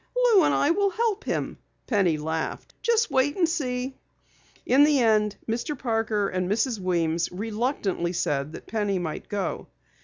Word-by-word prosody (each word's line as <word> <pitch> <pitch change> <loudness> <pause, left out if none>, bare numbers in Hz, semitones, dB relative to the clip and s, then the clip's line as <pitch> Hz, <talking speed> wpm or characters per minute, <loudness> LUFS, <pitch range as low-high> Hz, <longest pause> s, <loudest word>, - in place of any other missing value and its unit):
"Lou - - +5
and - - +3
I 290 - +3
will 400 +3 +2
help 435 +1 -1
him," - - -3 0.3
Penny 190 -9 +2
laughed. 160 +1 -4
"Just 460 -1 +2
wait 275 +4 +2
and 345 -3 +3
see!" 260 -5 -3 0.7
In 270 +3 +5
the 295 -2 +4
end, 215 -3 +3
Mr. 240 +6 -2
Parker 225 -4 0
and 185 -1 -2
Mrs. 225 +2 0
Weems 170 -2 0
reluctantly 210 -3 -2
said 145 -3 -1
that - - -9
Penny 205 -3 -1
might 165 -4 -5
go. 205 -1 -3
225 Hz, 155 wpm, -26 LUFS, 185-290 Hz, 0.7 s, Lou